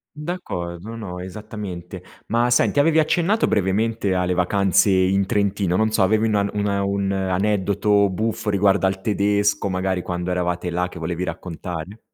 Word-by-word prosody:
D’accordo, 115 - -5
no, 95 -6 -6
esattamente. 95 -2 -7 0.2
Ma 120 +2 +1
senti, 120 +3 +3
avevi 160 +2 +4
accennato 175 +7 +2
brevemente 105 +1 0
alle 90 0 +1
vacanze 95 +2 +2
in 95 +1 +3
Trentino, 100 -3 0
non 110 +2 +2
so, 110 - +1
avevi 110 +3 +3
una 100 -2 +1
una 100 -1 0
un 100 0 -1
aneddoto 100 +1 +1
buffo 110 +3 -2
riguardo 100 -1 +3
al 95 0 -2
tedesco 100 0 +1
magari 95 0 -1
quando 90 0 -3
eravate 90 0 -1
là 90 +1 -1
che 90 - -11
volevi 85 +2 -3
raccontare. 90 +3 -6
100 Hz, 150 wpm, -22 LUFS, 90-105 Hz, 0.2 s, avevi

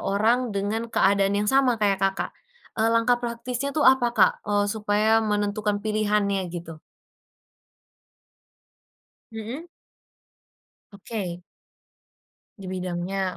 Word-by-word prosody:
orang 230 +5 +1
dengan 215 +4 -2
keadaan 200 -2 +2
yang 210 +1 0
sama 260 -3 +4
kayak 200 -3 +1
Kakak, 195 0 0 0.5
eee, 225 - +3
langkah 240 +1 +2
praktisnya 240 +2 -3
tuh 300 - +2
apa 260 -2 +5
Kak, 205 - +6 0.2
eee, 205 0 +2
supaya 215 +1 +2
menentukan 210 -1 -1
pilihannya 210 -2 +1
gitu? 165 -2 -8 2.5
Mhm. 225 +8 -6 1.3
Oke. 195 -4 -6 1.2
Dibidangnya 185 0 -3
210 Hz, 95 wpm, -25 LUFS, 195-230 Hz, 2.5 s, Kak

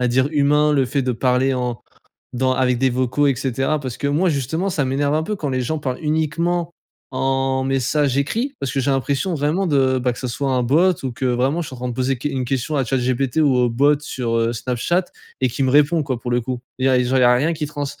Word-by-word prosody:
on - - +1
va - - +2
dire 130 +3 +2
humain. 150 +1 +3
Le 135 -3 +3
fait 140 +2 -1
de 125 -1 0
parler 130 +2 +1
en 125 -4 -3 0.5
dans 130 +1 +1
avec 125 -1 +1
des 130 +2 +2
vocaux 130 +3 +1
et 135 - +2
cetera. 135 +4 -1
Parce 130 -3 -5
que 140 - -2
moi, 160 +6 +2
justement, 160 +6 -1
ça 150 -6 -1
m'énerve 140 +2 0
un 155 - 0
peu 210 +6 -3
quand 150 -8 -4
les 130 -1 -1
gens 155 +5 -2
parlent 130 -3 -3
uniquement 165 +3 -1 0.4
en 135 0 0
message 135 +1 0
écrit. 230 - -1
Parce 135 - -3
que 135 - 0
j'ai 140 - +1
l'impression 140 +6 -1
vraiment 155 +6 0
de, 130 -4 +2
bah 125 0 0
que 120 - -8
ça 130 - -3
soit 135 +3 -2
un 130 -1 +1
bot 160 +10 +4
ou 130 - -2
que 125 - -7
vraiment 130 +6 +1
je 160 - -5
suis - - -9
en - - -12
train 125 +1 -4
de 120 - -3
poser 130 +1 -1
qu 135 - -3
une 135 -3 -2
question 135 +4 -2
à 135 - +1
ChatGPT 130 +1 -1
ou 145 -4 +4
au 125 -1 +3
bot 140 +5 +3
sur, 125 -5 -3
heu, 115 0 +1
Snapchat 125 +10 -1 0.3
et 130 - +2
qui 125 +3 -2
me 130 - +2
répond, 150 +3 +4
quoi, 130 -4 -3
pour 120 - -5
le 120 - +1
coup. 125 +1 -4 0.2
Et 130 - -4
il - - +3
y - - +4
a 130 -1 +4
genre, 130 +2 +1
il 130 - +3
y - - +5
a 125 0 +6
rien 145 +7 +1
qui 155 -1 -3
trans 145 -1 -4
135 Hz, 275 wpm, -20 LUFS, 125-150 Hz, 0.5 s, a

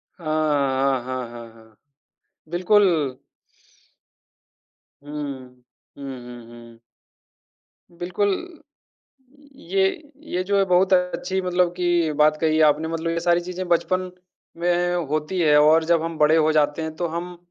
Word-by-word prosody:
हाँ, 170 - -15 0.3
हाँ, 135 -2 +1
हाँ, 130 -1 -5
हाँ, 115 -1 -10
हाँ, 110 -1 -20 0.7
बिल्कुल। 175 -6 +2 1.9
हुँ, 145 - -11 0.9
हुँ, 140 - -10
हुँ, 135 -2 -7
हुँ, 120 -1 -11
हुँ। 115 -1 -14 1.1
बिल्कुल 180 +4 -1 1.2
ये 195 -5 -1 0.5
ये 180 +1 -1
जो 200 +2 0
है 195 - +4
बहुत 185 +1 +3
अच्छी 185 +1 0
मतलब 180 -1 +1
कि 175 -3 +1
बात 155 0 +4
कही 160 -1 +2
आपने 150 +2 -1
मतलब 165 0 -3
ये 170 - -1
सारी 175 0 +2
चीज़ें 180 +1 -6
बचपन 185 +1 0 0.5
में 175 0 +1
होती 155 +5 -2
हैं 155 -3 +4
और 155 +2 +5
जब 165 -1 +4
हम 165 -1 -4
बड़े 150 +1 +4
हो 155 -1 +3
जाते 150 0 +1
हैं, 160 0 -5
तो 175 - -2
हम 175 +2 -6
165 Hz, 135 wpm, -22 LUFS, 150-180 Hz, 1.9 s, और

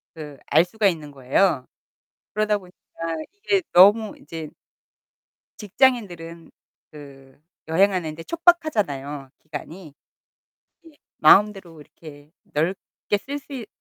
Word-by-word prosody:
그 150 -3 -9
알 160 +4 +4
수가 215 +3 +1
있는 155 -5 -3
거예요. 135 +2 +1 0.7
그러다 215 0 +1
보니까 180 -2 -17 0.6
이게 405 -1 0
너무 205 +4 +6
이제 160 0 -8 1.1
직장인들은 190 -8 -1 0.4
그 135 -3 -14 0.3
여행하는 175 -2 +1
데 165 - -9
촉박하잖아요, 205 - 0
기간이. 155 0 -9 0.9
예. - - -14 0.3
마음대로 190 -1 +4
이렇게 145 -1 -15 0.2
넓게 180 +5 -2
쓸 285 +5 -6
수 285 - -13
있 240 -5 -6
175 Hz, 235 characters per minute, -23 LUFS, 150-210 Hz, 1.1 s, 너무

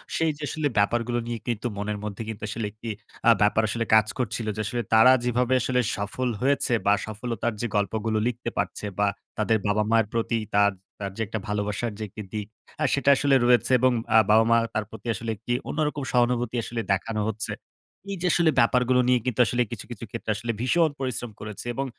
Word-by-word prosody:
সেই 165 -1 +2
যে 155 - -8
আসলে 155 +1 -1
ব্যাপারগুলো 120 +3 +1
নিয়ে 120 -1 -3
কিন্তু 120 0 -1
মনের 105 +1 -2
মধ্যে 105 +1 -5
কিন্তু 110 -1 -7
আসলে 115 0 -3
১ - - -33
টি 115 - -3 0.4
আ - - +9
ব্যাপার 105 +2 +4
আসলে 115 +1 -1
কাজ 110 -1 +5
করছিল। 115 -2 -2
যে 110 - -2
আসলে 120 +3 -2
তারা 110 +3 +8
যেভাবে 125 +1 +1
আসলে 125 +1 +1 0.2
সফল 110 +5 -2
হয়েছে 135 -1 +2
বা 100 - +5
সফলতার 115 +1 -3
যে 120 - 0
গল্পগুলো 110 +2 0
লিখতে 120 0 -3
পারছে - - -2
বা 105 - +3 0.3
তাদের 110 +1 +2
বাবা-মায়ের 105 +1 +2
প্রতি 115 0 0 0.2
তার, 100 0 +5 0.3
তার 100 -1 -4
যে - - -3
১ - - -17
টা - - 0
ভালোবাসার 105 +2 -2
যে 110 - -5
১ 95 - -21
টি 105 - -4
দিক 105 -1 -3 0.4
আ - - +2
সেটা 140 0 +2
আসলে 140 0 +3
রয়েছে 125 +1 +4
এবং 130 +1 +4 0.2
আ - - +9
বাবা-মা 115 +2 +5 0.2
তার 110 - -1
প্রতি 110 +1 -10
আসলে 115 +3 -5
১ 100 - -25
টি 120 - +1 0.2
অন্যরকম 150 -1 -1
সহানুভূতি 120 -1 +1
আসলে 115 0 -3
দেখানো 105 +3 0
হচ্ছে। 110 0 -2 0.6
এই 195 - -3
যে 180 - +1
আসলে 170 -2 +4
ব্যাপারগুলো 125 +1 +3
নিয়ে 125 -1 +4
কিন্তু 125 -3 -2
আসলে 120 +2 0
কিছু, 120 - -6
কিছু 115 0 -7
ক্ষেত্রে 115 -2 -3
আসলে 115 +3 -3
ভীষণ 165 +5 +3
পরিশ্রম 125 -3 -3
করেছে। 105 0 -7
এবং 135 +3 -2
115 Hz, 205 wpm, -25 LUFS, 105-125 Hz, 0.6 s, আ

